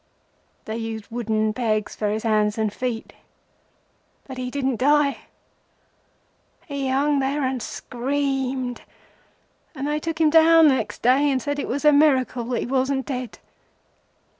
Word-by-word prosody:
They 220 +1 -4
used 225 -2 -6
wooden 220 -2 -1
pegs 215 -3 -1
for 210 - -1
his 215 +1 -2
hands 215 -1 +1
and 220 -1 0
his - - -19
feet; 245 -3 -3 1.1
and 265 - -7
he 250 0 -3
didn't 265 -2 -1
die. 290 +1 +2 1.4
He 280 -2 -3
hung 280 +2 +2
there 275 +2 -1
and 260 -1 -1
screamed, 265 0 -3 0.9
and 275 +1 -4
they 300 +1 -1
took 330 +1 -4
him 315 -2 +4
down 325 0 +7
next 265 - -2
day, 265 +4 +4
and 265 -2 +1
said 285 +3 -3
it - - -3
was 285 +4 -3
a 300 - +7
miracle 265 -5 +3
that 240 0 -2
he - - -3
wasn't 265 +1 0
dead. 255 -5 -5
260 Hz, 150 wpm, -23 LUFS, 235-285 Hz, 1.4 s, down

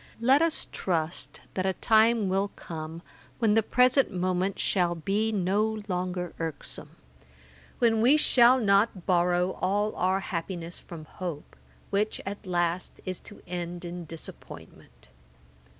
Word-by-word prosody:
Let 260 +5 +4
us 330 -1 +2
trust 165 -2 -2
that 185 - -1
a 190 - +1
time 220 0 +4
will 195 +2 +1
come, 160 +1 -7 0.3
when 225 -3 +3
the 225 - +5
present 250 +4 +3
moment 185 +1 -1
shall 175 -3 +1
be 200 +7 0
no 210 +2 0
longer 180 -1 -3
irksome; 160 -4 -5 0.8
when 225 -2 +3
we 260 +6 +6
shall 255 -4 +5
not 200 -3 +2
borrow 180 0 +2
all 205 +3 0
our 190 +2 +1
happiness 170 -1 -4
from 165 -3 -10
hope, 170 -3 -7 0.4
which 210 +2 0
at 200 0 -6
last 175 0 -1
is 185 -1 -4
to 205 - -13
end 175 0 -5
in 175 0 -6
disappointment. 65 - -10
185 Hz, 135 wpm, -27 LUFS, 175-215 Hz, 0.8 s, we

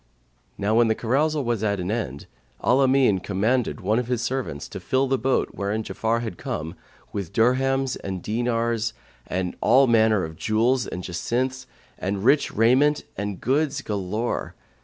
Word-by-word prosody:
Now 100 +2 0
when 115 +1 +5
the 110 - +2
carousal 145 +6 +1
was 115 -3 -1
at 100 -2 0
an 90 +2 -2
end, 70 - -3 0.4
Al 125 - +4
Amin 130 -7 +4
commanded 110 +6 0
one 105 +5 +1
of 125 - -3
his 120 -2 -1
servants 120 - -3
to - - -7
fill 130 +1 +1
the 135 -1 0
boat, 135 0 +1
wherein 105 +2 -2
Ja'afar 115 +2 -1
had 110 -7 -6
come, 80 +2 -4 0.4
with 100 -5 -4
dirhams 130 +3 +2
and 95 -2 -4
dinars 115 0 -1 0.3
and 90 -1 -2
all 130 +5 +5
manner 110 -4 +3
of 80 0 -6
jewels 115 +2 +1
and 90 - -5
jacinths 130 +9 -2 0.3
and 95 +2 -2
rich 140 +3 +4
raiment 130 +7 +3
and 100 -1 -4
goods 140 +2 0
galore. 105 +3 -3
115 Hz, 160 wpm, -24 LUFS, 100-130 Hz, 0.4 s, when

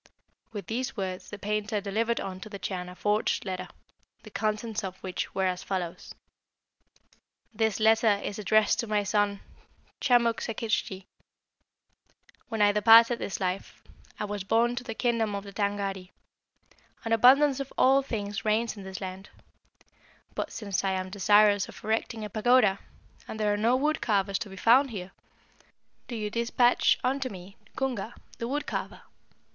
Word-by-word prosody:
With 205 -4 -6
these 240 +4 -3
words 185 -2 -4
the 205 - -7
painter 210 +1 -2
delivered 220 +3 -1
unto 190 +2 -6
the 200 - -7
Chan 180 -2 -4
a 180 - -11
forged 210 +2 0
letter, 185 -1 -4 0.6
the - - -12
contents 215 0 -2
of 190 -1 -5
which 185 -1 -4
were 190 0 +1
as 185 -1 -1
follows: 180 -4 -5 1.4
"'This 220 -1 0
letter 220 -1 +4
is 205 - -4
addressed 215 +1 +3
to 235 - -1
my 210 -1 +1
son 205 0 0 0.6
Chamuk 235 -3 +3
Sakiktschi. 215 -4 -2 1.4
"'When 220 -2 +1
I 205 - +5
departed 230 +3 +6
this 195 - -4
life, 185 0 -4 0.4
I 210 - -1
was 205 -1 -4
borne 230 +4 +2
to 245 - -3
the 225 -3 -6
kingdom 230 -4 0
of 200 - -4
the 200 -1 -11
Tângâri. 200 -2 -2 1.0
An 225 - 0
abundance 270 +4 +5
of 275 -1 -5
all 270 +1 +5
things 205 -6 -4
reigns 220 +1 +1
in 205 - -9
this 190 0 -8
land; 190 0 -7 1.0
but - - -4
since 200 -4 -3
I 195 -1 +1
am 185 0 -3
desirous 205 +1 +4
of - - -13
erecting 220 0 -2
a - - -6
pagoda, 215 -2 +3 0.5
and 220 - -7
there 210 -1 +2
are - - +1
no 225 +4 +2
wood 300 +4 0
carvers 200 -2 +1
to 210 - -6
be 190 - -10
found 255 +7 +5
here, 190 -5 -7 1.0
do 240 - -5
you 210 -2 -3
despatch 235 +1 +3
unto 265 +1 0
me 190 -1 -11 0.2
Cunga, 240 -4 -3 0.2
the 230 - -3
wood 290 +4 -2
carver. - - -5
210 Hz, 160 wpm, -28 LUFS, 195-230 Hz, 1.4 s, departed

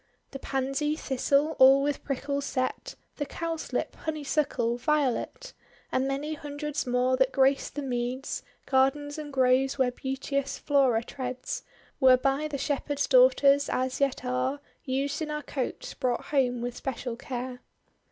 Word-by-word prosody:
The 270 - -7
Pansy, 275 +3 -1
Thistle 285 +2 +1
all 270 +1 +8
with 290 -1 -1
prickles 280 0 -2
set, 260 - -2 0.2
The 290 - -2
Cowslip, 330 -1 -3
Honeysuckle, 285 -6 -1
Violet, 285 -2 -1 0.4
And 260 +1 +1
many 280 +3 -2
hundreds 295 -1 -4
more 250 +1 +2
that 265 0 +3
graced 270 +1 +2
the 290 - -3
meads, 250 +1 -3 0.2
Gardens 290 +3 +1
and 295 -1 -6
groves, 260 0 +3
where 260 -2 +2
beauteous 270 +2 -3
Flora 265 -6 +2
treads, 260 - -5 0.4
Were 260 -2 +7
by 275 +4 0
the 295 -2 -4
Shepherds' 285 0 -1
daughters 285 - +5
(as 260 +1 -1
yet 275 -2 0
are 255 +3 -1 0.2
Used 275 +4 -1
in 310 - -2
our 300 0 -3
cotes) 265 -3 -4
brought 245 -1 -1
home 250 -4 +2
ivith 245 0 -3
special 250 -2 -4
care. 250 0 -5
270 Hz, 140 wpm, -28 LUFS, 255-290 Hz, 0.4 s, all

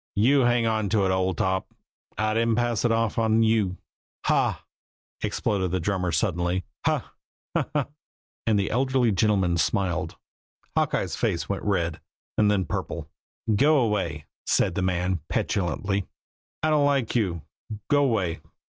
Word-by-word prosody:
"You 125 +8 +4
hang 120 -2 +3
on 110 -2 0
to 105 -2 +2
it, 95 - +2
old 95 -2 0
top. 95 0 -1 0.4
I 110 0 +1
didn't 115 0 +2
pass 120 -2 0
it 120 - +3
off 115 0 +1
on 110 0 +3
you." 110 -5 +2 0.5
"Haw!" - - +1 0.6
exploded 95 -3 0
the 95 +2 -1
drummer 90 0 -1
suddenly. 90 +2 0 0.2
"Haw - - +2 0.5
haw, - - +1
haw!" 145 -3 +2 0.6
And 110 -2 +4
the 100 - 0
elderly 130 -1 +2
gentleman 95 -3 +2
smiled. 90 -1 0 0.6
Hawkeye's - - 0
face - - -1
went - - -2
red, 85 -6 -1 0.3
and 105 -1 +3
then 100 -3 +2
purple. - - -4 0.4
"Go 145 +2 +4
'way!" 85 -8 -2 0.2
said - - +2
the 95 - -1
man 90 0 0
petulantly. 95 +2 -1 0.6
"I 155 - +3
don't 145 -2 +4
like 135 -5 +1
you. 90 -9 0 0.4
Go 145 -1 +4
'way! 95 -9 0
100 Hz, 145 wpm, -25 LUFS, 90-115 Hz, 0.6 s, You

